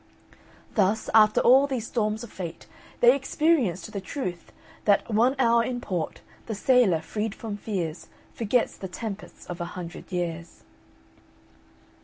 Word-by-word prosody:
Thus, 205 +1 +1
after 215 -1 +6
all 265 +3 +6
these 255 -5 -3
storms 215 -1 -1
of 235 - -10
fate, 170 -3 -7 0.4
they 245 +2 +7
experienced 270 - +1
the 200 - -3
truth 185 -5 -5 0.3
that 205 -1 +3
"One 240 +5 +4
hour 235 -2 +4
in 245 +1 -3
port, 180 -9 -4 0.3
the 220 - -3
sailor, 205 -7 +3
freed 215 +2 -3
from 220 -3 -5
fears, 180 -6 -4 0.3
Forgets 230 +2 0
the 190 - -6
tempests 210 +2 -7
of 175 0 -6
a - - -1
hundred 175 0 -8
years." 170 -2 -4
215 Hz, 140 wpm, -26 LUFS, 180-240 Hz, 0.4 s, they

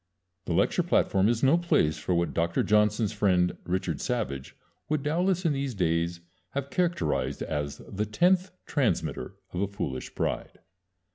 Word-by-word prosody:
The - - -1
lecture - - +2
platform 95 +2 +2
is 120 +1 0
no 145 +6 +5
place 80 - +2
for 90 - 0
what 85 -4 0
Doctor 85 +2 +1
Johnson's 105 0 +2
friend 90 -3 +2
Richard 95 +2 -1
Savage 105 - -3 0.3
would 155 -2 0
doubtless 175 +4 +1
in 160 - +3
these 135 -3 -2
days 85 -1 0 0.3
have 140 0 -3
characterized 70 - 0
as 75 -1 -3
"the 105 +2 -2
tenth 180 - +3 0.2
transmitter 135 -6 -1 0.2
of 90 - -2
a 100 - +1
foolish 95 -10 -5
pride." - - -2
105 Hz, 150 wpm, -28 LUFS, 85-140 Hz, 0.3 s, no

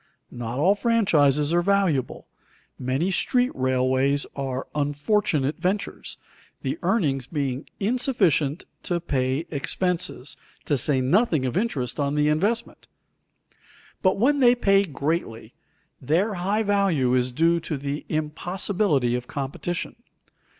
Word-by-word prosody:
Not 120 0 -5
all 175 +8 +4
franchises 165 - +2
are 175 - +4
valuable; 185 -8 0 0.5
many 135 +9 0
street 250 +6 +1
railways 130 +2 +1
are 135 -1 -3
unfortunate 145 0 0
ventures, 190 +4 -3 0.5
the - - -2
earnings 140 - 0
being 140 -2 -3
insufficient 200 - +1 0.2
to 175 -1 -1
pay 135 -1 -1
expenses, 165 -1 -2 0.3
to 145 - +1
say 130 +1 +1
nothing 160 - +2
of 125 - -2
interest 155 - -1
on 140 0 0
the 150 0 +2
investment. 205 +10 -1 1.1
But 185 -1 +2
when 280 +7 +3
they 245 -2 +6
pay 195 -4 +3
greatly, 145 -6 -3 0.5
their 175 - +1
high 200 +4 0
value 195 -11 +2
is 125 0 +1
due 165 +6 +2
to 160 -2 -4
the 140 +2 -4
impossibility 155 - 0
of 125 0 -3
competition. 150 - -4
155 Hz, 120 wpm, -24 LUFS, 135-195 Hz, 1.1 s, they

